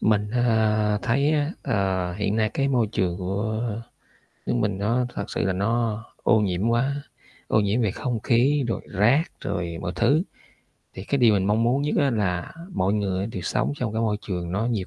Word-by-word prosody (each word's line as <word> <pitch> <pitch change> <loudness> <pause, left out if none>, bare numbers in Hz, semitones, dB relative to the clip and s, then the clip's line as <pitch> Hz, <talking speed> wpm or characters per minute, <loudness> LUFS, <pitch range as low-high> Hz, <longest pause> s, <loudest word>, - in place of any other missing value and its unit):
Mình, 105 -1 +2
à, 110 -3 +2
thấy 135 +5 +2
á, 150 +1 +1
ờ, 95 -3 0
hiện 105 +1 -1
nay 110 -1 +1
cái 140 0 +1
môi 125 -4 +2
trường 95 -5 -1
của 105 +4 -2 0.8
nước - - 0
mình 105 -5 0
nó 115 +5 +1
thật 100 - -3
sự - - -2
là 95 - +1
nó 110 +3 0 0.2
ô 110 - +4
nhiễm 95 +1 0
quá, 135 +5 0 0.4
ô - - +3
nhiễm 105 +3 +1
về 105 -4 +1
không 120 +1 -3
khí, 130 +6 +2
rồi 115 - -2
rác, 115 +10 +3 0.2
rồi 85 -4 -3
mọi 90 - -2
thứ. 155 +5 +3 0.7
Thì 95 - -7
cái 140 +6 0
điều 115 -4 +5
mình 95 -1 +1
mong 105 +2 +2
muốn 125 +4 +2
nhất 150 - 0
á, 140 -1 +3
là 95 -6 -1 0.2
mọi 95 +2 +1
người 100 -2 -1
đều 100 -5 -6
sống 70 -3 0
trong 115 -4 -2
cái 110 - -1
môi 105 -2 +1
trường 90 -4 -4
nó 105 +4 0
nhiều 110 -6 -1
110 Hz, 200 wpm, -24 LUFS, 100-120 Hz, 0.8 s, điều